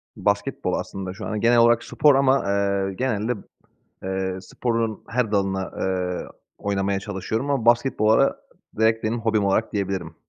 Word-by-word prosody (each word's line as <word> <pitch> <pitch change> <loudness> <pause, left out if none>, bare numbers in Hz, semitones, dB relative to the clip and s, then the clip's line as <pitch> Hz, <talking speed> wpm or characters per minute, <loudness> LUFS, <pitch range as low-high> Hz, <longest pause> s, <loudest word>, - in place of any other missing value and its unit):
Basketbol - - -1
aslında 95 -1 -4
şu 105 +3 -8
an. 105 -1 -3
Genel 120 +1 +4
olarak 120 0 +5
spor 145 -2 +3
ama, 135 0 +3
eee, 100 -1 0
genelde, 115 0 -1 0.7
eee, 95 0 -2
sporların 115 +2 -2
her 115 -3 -1
dalına, 95 -1 +1
ııı, 90 -1 -3 0.3
oynamaya 100 -1 -1
çalışıyorum 110 +6 -3
ama 135 -5 0
basketbola 120 -2 +3 0.4
direkt 110 0 +2
benim 115 +2 -1
hobim 110 -2 +1
olarak 100 +3 +1
diyebilirim. 95 -5 -3
105 Hz, 140 wpm, -23 LUFS, 95-115 Hz, 0.7 s, olarak